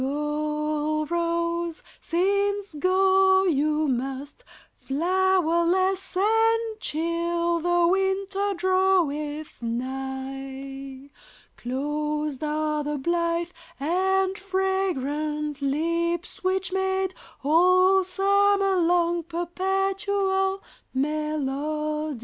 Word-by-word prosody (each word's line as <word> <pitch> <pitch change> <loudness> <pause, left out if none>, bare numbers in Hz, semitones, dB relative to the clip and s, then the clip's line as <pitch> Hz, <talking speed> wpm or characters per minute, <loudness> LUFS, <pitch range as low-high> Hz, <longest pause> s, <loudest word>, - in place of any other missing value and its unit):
Go, 300 +2 -1
rose, 340 0 -1 0.2
since 400 +2 0
go 380 +3 +4
you 305 -2 +1
must, 270 - -3 0.4
Flowerless 370 +3 +1
and 450 +2 +2
chill 340 +1 -1
the 350 +1 +2
winter 390 +2 0
draweth 340 -6 0
nigh; 270 +2 -5 0.4
Closed 295 +3 -3
are 305 0 -1
the 295 0 -2
blithe 340 +3 0 0.3
and 380 +5 +1
fragrant 305 -7 -1
lips 335 +6 -1
which 375 0 0
made 380 0 0 0.3
All 365 +5 +5
summer 395 +1 +2
long 345 0 +2
perpetual 385 +3 -1 0.3
melody. 300 0 -2
340 Hz, 75 wpm, -25 LUFS, 300-380 Hz, 0.4 s, All